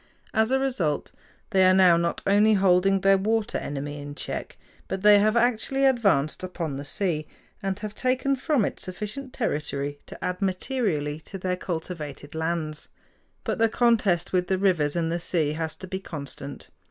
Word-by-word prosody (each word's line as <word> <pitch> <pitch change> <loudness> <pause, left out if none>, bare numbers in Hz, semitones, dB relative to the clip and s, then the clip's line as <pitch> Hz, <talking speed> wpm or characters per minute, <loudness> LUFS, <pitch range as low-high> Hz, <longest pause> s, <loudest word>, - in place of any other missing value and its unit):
As 220 +1 +3
a 265 - +3
result 225 - -1 0.4
they 190 -2 +4
are 185 0 +6
now 185 -2 +6
not 170 0 -1
only 205 +2 +5
holding 195 0 +3
their 195 0 +5
water 220 +2 0
enemy 145 +1 -5
in 145 0 -8
check, - - -5 0.3
but 190 0 -4
they 210 -1 +8
have 215 +3 +3
actually 245 +3 +2
advanced 200 - +2
upon 170 -5 -4
the 140 - -5
sea, 155 -1 -1 0.3
and 195 -1 -2
have 210 -1 -5
taken 255 +3 +1
from 270 -4 +1
it - - -4
sufficient 210 +8 -5
territory 145 - -2
to - - -10
add 180 +1 -3
materially 185 - -1
to 175 +5 -9
their 185 0 -1
cultivated 160 -5 -6
lands. 160 -1 -3 0.6
But - - -2
the 225 0 +4
contest 215 -8 +2
with 180 -1 +2
the 190 - +1
rivers 175 -6 +2
and 165 -1 0
the 170 - -1
sea 165 -3 0
has 160 0 -3
to 185 - -9
be 190 +1 -4
constant. 140 -5 -7
185 Hz, 175 wpm, -26 LUFS, 160-215 Hz, 0.6 s, they